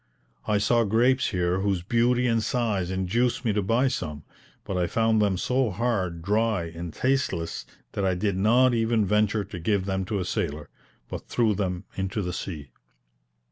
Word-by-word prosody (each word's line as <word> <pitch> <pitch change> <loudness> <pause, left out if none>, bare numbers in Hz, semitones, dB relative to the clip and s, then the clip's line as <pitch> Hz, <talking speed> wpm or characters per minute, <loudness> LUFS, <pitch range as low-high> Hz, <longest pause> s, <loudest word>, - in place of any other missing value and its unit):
I 105 -1 +2
saw 115 +3 +3
grapes 120 +5 +3
here 90 -1 0
whose 95 -3 0
beauty 120 +4 +2
and 115 -2 +2
size 110 -6 -1
induced 110 +7 0
me 110 - +2
to 105 - +1
buy 115 +7 +2
some; 75 - -4 0.4
but 95 - -4
I 90 -1 +1
found 110 +1 +2
them 100 -3 +2
so 125 +5 +1
hard, 95 -6 -1
dry, 105 0 +1
and 85 0 -6
tasteless, 110 -9 -1 0.2
that 100 - -3
I 95 -1 +2
did 100 +1 0
not 120 +6 +4
even 115 -2 +2
venture 105 +1 +2
to 95 -2 -8
give 95 +2 0
them 95 -1 -1
to 105 +2 -2
a 95 - -2
sailor, 75 -3 -3 0.4
but - - -7
threw 115 -3 +2
them 90 -3 -2
into 95 +2 -2
the 90 0 -3
sea. 75 -8 -6
105 Hz, 180 wpm, -26 LUFS, 90-115 Hz, 0.4 s, not